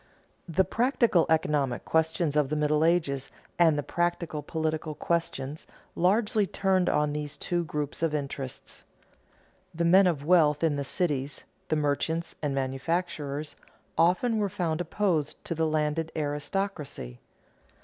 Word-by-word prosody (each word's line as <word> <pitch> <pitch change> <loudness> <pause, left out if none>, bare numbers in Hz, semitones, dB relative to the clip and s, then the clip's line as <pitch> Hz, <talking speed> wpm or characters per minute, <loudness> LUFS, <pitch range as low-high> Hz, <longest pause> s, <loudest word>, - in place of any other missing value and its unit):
_ - - -11
The 190 - +5
practical 235 - +2
economic 145 -5 +1
questions 160 -1 +1
of 150 -3 +2
the 150 - -1
Middle 150 0 +2
Ages 155 -6 +1 0.3
and 165 -3 +5
the 145 - -1
practical 170 -2 -1
political 155 0 -2
questions 155 -4 -2 0.3
largely 205 +3 +2
turned 190 -1 +1
on 150 0 +1
these 150 0 -4
two 175 -1 -1
groups 150 -1 -4
of 165 -2 +2
interests. 140 -2 -6 0.9
The 170 +1 0
men 185 +3 +6
of 150 -5 -1
wealth 155 -3 +4
in 160 -3 +3
the 140 - -2
cities, 140 -3 -2 0.2
the 155 - +1
merchants 160 +3 -1
and 145 -3 -1
manufacturers, 145 +2 -2 0.4
often 185 +7 +3
were 205 -1 +1
found 170 -3 -1
opposed 175 -6 -1
to - - -2
the 160 0 0
landed 155 +1 0
aristocracy. 145 - -3
160 Hz, 140 wpm, -28 LUFS, 145-175 Hz, 0.9 s, men